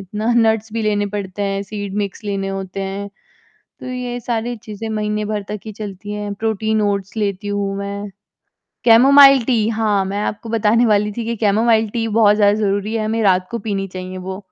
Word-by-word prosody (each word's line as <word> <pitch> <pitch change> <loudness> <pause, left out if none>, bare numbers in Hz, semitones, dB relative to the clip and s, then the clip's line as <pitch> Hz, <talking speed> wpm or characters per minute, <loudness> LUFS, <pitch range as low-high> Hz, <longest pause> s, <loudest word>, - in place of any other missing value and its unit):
इतना 210 +3 -5
नट्स 220 -1 +2
भी 230 -1 -2
लेने 205 -1 +1
पड़ते 200 0 -4
हैं, 195 0 -1
सीड 205 -1 -6
मिक्स 200 +2 -3
लेने 195 -1 -2
होते 195 0 -5
हैं, 195 +1 -4 0.7
तो - - -8
ये 250 -1 -4
सारी 235 0 -2
चीज़ें 215 +1 -7
महीने 210 -1 -2
भर 210 -1 -2
तक 210 0 -4
ही 215 - -6
चलती 205 0 -7
हैं 205 0 -4
प्रोटीन 220 0 -1
ओट्स 200 0 -2
लेती 205 -1 -2
हूँ 200 -1 -2
मैं, 200 0 -5 0.7
कैमोमाइल 270 +2 +7
टी 225 -4 +1
हाँ, 215 -3 +1
मैं 200 +2 -3
आपको 210 +2 -4
बताने 230 +1 +3
वाली 210 -1 +2
थी 230 - -2
कि 235 0 -2
कैमोमाइल 220 +1 +3
टी 225 0 -2
बहुत 210 -1 +4
ज़्यादा 205 -1 +4
ज़रूरी 205 +2 0
है, 220 -1 -1
हमें 225 +1 0
रात 185 -2 +3
को 235 - -3
पीनी 195 -1 -1
चाहिए 185 0 -7
वो। 190 +1 -6
210 Hz, 195 wpm, -19 LUFS, 200-225 Hz, 0.7 s, कैमोमाइल